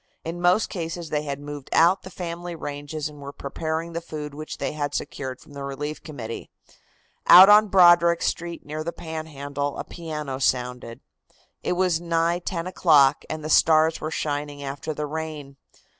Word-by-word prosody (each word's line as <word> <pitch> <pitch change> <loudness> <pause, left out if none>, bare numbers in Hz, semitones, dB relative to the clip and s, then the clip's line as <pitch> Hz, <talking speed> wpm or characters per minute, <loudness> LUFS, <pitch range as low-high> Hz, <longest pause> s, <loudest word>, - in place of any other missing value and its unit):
In 170 +2 -5
most 180 +5 +3
cases 165 -2 -5
they 150 - 0
had 140 -1 -4
moved 145 -1 -8
out 175 +4 +4
the 185 - -10
family 175 -1 -6
ranges, 145 0 -5
and 150 -1 -12
were 140 0 -7
preparing 160 +4 -4
the 170 - -3
food 150 -3 -7
which 155 +1 -7
they - - -2
had 145 -1 -3
secured 130 -3 -4
from 145 - -17
the 140 -1 -7
Relief 145 +2 -5
Committee. 125 -8 -7 0.8
Out 185 +3 +10
on 210 +1 +7
Broderick 175 -3 +5
street, 170 0 -3
near 155 +1 -5
the 170 - -3
Panhandle, 145 -4 -5
a - - -3
piano 150 -5 -6
sounded. 125 -2 -1 0.6
It - - -1
was 180 -2 +1
nigh 170 0 +1
ten 170 -1 -4
o'clock 155 -7 +4
and 155 -1 -5
the - - -3
stars 160 +1 +4
were 155 - -3
shining 145 -1 -3
after 140 +3 -5
the 150 0 -3
rain. 150 -2 -6
155 Hz, 175 wpm, -24 LUFS, 145-170 Hz, 0.8 s, Out